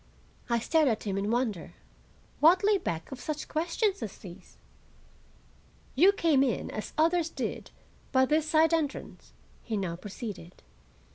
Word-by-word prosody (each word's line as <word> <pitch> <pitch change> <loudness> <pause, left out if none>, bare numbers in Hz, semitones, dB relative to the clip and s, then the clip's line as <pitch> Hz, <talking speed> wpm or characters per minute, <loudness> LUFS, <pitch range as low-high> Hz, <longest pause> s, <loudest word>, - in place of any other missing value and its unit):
I 235 - +2
stared 310 +6 +2
at 225 -4 0
him 200 -3 -2
in 200 +1 -1
wonder. 230 -6 -1 0.7
What 345 +5 +5
lay 410 -1 +3
back 170 - -4
of 270 - -7
such 305 -1 -4
questions 355 +6 -1
as 210 - -6
these? 185 0 -13 1.4
"You 355 +9 +6
came 330 -8 +2
in, 265 -4 0
as 215 - -6
others 330 +1 +2
did, - - -5 0.4
by 260 -1 +4
this 305 +3 +1
side 320 +1 +4
entrance," 310 -4 -3 0.3
he 220 -2 -3
now 185 -4 -2
proceeded. 195 -2 -8
275 Hz, 145 wpm, -29 LUFS, 210-325 Hz, 1.4 s, You